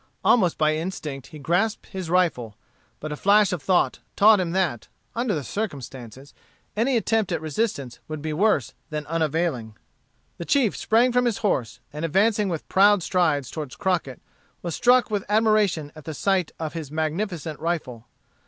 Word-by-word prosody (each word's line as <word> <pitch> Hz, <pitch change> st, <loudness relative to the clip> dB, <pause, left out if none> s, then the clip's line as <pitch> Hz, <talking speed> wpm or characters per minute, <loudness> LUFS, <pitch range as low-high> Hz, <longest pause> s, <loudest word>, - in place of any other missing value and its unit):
Almost 185 Hz, -8 st, +4 dB
by 155 Hz, 0 st, +2 dB
instinct 155 Hz, -6 st, -5 dB
he 155 Hz, -, -11 dB
grasped 175 Hz, +9 st, 0 dB
his 190 Hz, -4 st, -6 dB
rifle, 160 Hz, -, +1 dB, 0.4 s
but 155 Hz, -, -6 dB
a -, -, -2 dB
flash 200 Hz, +3 st, +4 dB
of 175 Hz, -, -3 dB
thought 185 Hz, +4 st, +1 dB, 0.2 s
taught 210 Hz, 0 st, +6 dB
him 180 Hz, -2 st, -1 dB
that, 175 Hz, -, -1 dB, 0.3 s
under 235 Hz, -3 st, 0 dB
the 150 Hz, -, -3 dB
circumstances, 135 Hz, -, -6 dB, 0.4 s
any 240 Hz, +4 st, +2 dB
attempt 220 Hz, -3 st, 0 dB
at 170 Hz, -, 0 dB
resistance 155 Hz, -, -3 dB
would 155 Hz, -1 st, -5 dB
be 155 Hz, +1 st, -4 dB
worse 170 Hz, -, +1 dB, 0.2 s
than 150 Hz, -1 st, -4 dB
unavailing. 155 Hz, -8 st, -1 dB, 0.6 s
The 170 Hz, -, -5 dB
chief 260 Hz, -4 st, +2 dB
sprang 235 Hz, +3 st, +3 dB
from 250 Hz, 0 st, +2 dB
his 235 Hz, -4 st, +1 dB
horse, 125 Hz, -, -1 dB
and 150 Hz, +2 st, -5 dB
advancing 205 Hz, +5 st, +2 dB
with 165 Hz, -3 st, -4 dB
proud 200 Hz, -1 st, +4 dB
strides 155 Hz, -9 st, +1 dB
toward 150 Hz, -5 st, -6 dB
Crockett, 170 Hz, -8 st, -2 dB, 0.4 s
was 170 Hz, -2 st, -3 dB
struck 245 Hz, +1 st, +3 dB
with 205 Hz, -2 st, -1 dB
admiration 210 Hz, -8 st, +2 dB
at 155 Hz, 0 st, -8 dB
sight 190 Hz, -2 st, +1 dB
of 160 Hz, -2 st, -4 dB
his 160 Hz, -4 st, -6 dB
magnificent 160 Hz, 0 st, -3 dB
rifle. 145 Hz, -9 st, -3 dB
170 Hz, 160 wpm, -24 LUFS, 150-205 Hz, 0.6 s, taught